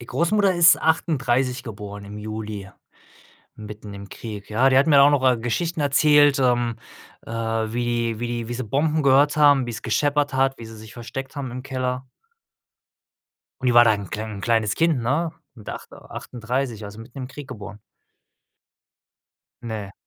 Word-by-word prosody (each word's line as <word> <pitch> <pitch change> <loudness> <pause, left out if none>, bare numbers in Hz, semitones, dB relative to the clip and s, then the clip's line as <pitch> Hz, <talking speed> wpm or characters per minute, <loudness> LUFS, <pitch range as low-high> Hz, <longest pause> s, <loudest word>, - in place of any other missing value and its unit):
Die 120 - -11
Großmutter 190 +5 +2
ist 175 0 +6
38 135 -5 +1
geboren 105 -3 -8
im 105 +1 -9
Juli, 105 -2 -6 0.9
mitten 105 -1 -9
im 100 0 -10
Krieg, 105 -3 -8
ja? 125 +5 +3
Die 130 - +4
hat 140 - +4
mir 145 -3 +7
auch 140 - +7
noch, 145 -3 +1
äh, 125 -2 +4
Geschichten 155 +8 -2
erzählt, 145 0 +4
ähm, 120 -2 +1 0.5
äh, - - -9
wie 115 0 -1
wie 120 -1 -3
wie 120 - -4
sie 130 - -4
Bomben 150 +6 0
gehört 140 +2 +4
haben, 145 -3 +5
wie's 120 0 -6
gescheppert 145 -1 0
hat, 135 0 +1
wie 115 - -9
sie 110 0 -11
sich 110 +2 -12
versteckt 135 +4 -7
haben 135 -3 -5
im 125 +1 -7
Keller. 130 -1 -3 1.6
Und 130 - -2
die 120 - +2
war 120 0 +8
da 110 - +5
'n 100 - -5
'n 95 - -9
klein 105 -2 -5
kleines 110 -2 +1
Kind, 165 -5 +2
ne? 150 +8 0 0.2
Mit 110 -4 -13
acht - - -8
38, 120 -2 -5
also, 100 +2 -9
mitten 120 +4 -12
im 130 -1 -5
Krieg 140 0 -9
geboren. 105 -1 -9 1.8
Ne. 110 -4 -6
120 Hz, 170 wpm, -23 LUFS, 110-140 Hz, 1.8 s, war